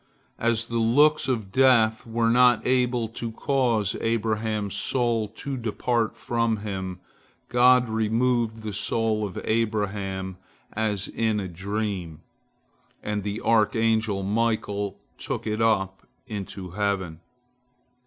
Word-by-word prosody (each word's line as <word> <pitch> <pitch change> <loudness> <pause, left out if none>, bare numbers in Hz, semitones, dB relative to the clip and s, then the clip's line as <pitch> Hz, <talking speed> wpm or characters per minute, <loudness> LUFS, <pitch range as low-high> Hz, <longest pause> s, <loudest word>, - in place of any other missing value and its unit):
As 115 0 +1
the 115 0 -2
looks 145 +6 +4
of 110 -7 -2
Death 115 -3 +4
were 115 0 +1
not 125 -2 +5
able 125 -2 +2
to 115 0 -5
cause 115 -5 0
Abraham's 110 -2 -1
soul 115 +1 0
to 140 -1 -5
depart 115 0 -1
from 115 -2 0
him, 95 -3 -4 0.5
God 125 0 +5
removed 110 +1 0
the 105 -1 -4
soul 110 +2 0
of 90 - -7
Abraham 100 -4 -1 0.4
as 105 -3 -1
in 110 -2 0
a 95 - -3
dream, 95 -2 -4 0.8
and 105 -1 -2
the 105 +2 -4
archangel 110 -2 +2
Michael 105 -1 -1 0.2
took - - -4
it 110 0 -1
up 95 -4 +1 0.2
into 100 -5 -6
heaven. 95 -4 -2
110 Hz, 115 wpm, -25 LUFS, 100-115 Hz, 0.8 s, not